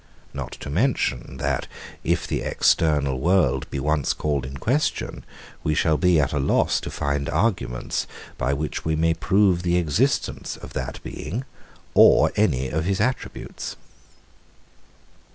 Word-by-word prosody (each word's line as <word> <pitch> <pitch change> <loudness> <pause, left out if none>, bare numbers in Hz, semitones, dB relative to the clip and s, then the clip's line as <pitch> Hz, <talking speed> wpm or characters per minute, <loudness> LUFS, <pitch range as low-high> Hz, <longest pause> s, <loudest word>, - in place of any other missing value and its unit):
Not - - -5
to 70 - -7
mention, 75 - 0
that, 70 0 -1 0.4
if - - 0
the - - -2
external 70 -5 +2
world 80 -5 +2
be 70 - -3
once 75 0 +1
called 70 -4 -1
in 70 +1 -7
question, 135 - -1 0.4
we 75 - +1
shall 80 0 +3
be 90 0 +3
at 70 -1 +1
a 75 - +1
loss 70 - +2
to - - -6
find 70 0 -2
arguments, 80 - -1 0.3
by 65 - -1
which 75 +2 -3
we 80 0 0
may 80 +1 +2
prove 95 +2 +2
the 90 0 +1
existence 80 -5 0
of - - -11
that - - -5
Being 105 - -5 0.5
or - - +6
any 65 -11 +1
of 80 +1 -1
his 95 +2 0
attributes. 125 +5 -3
75 Hz, 145 wpm, -24 LUFS, 70-90 Hz, 0.5 s, or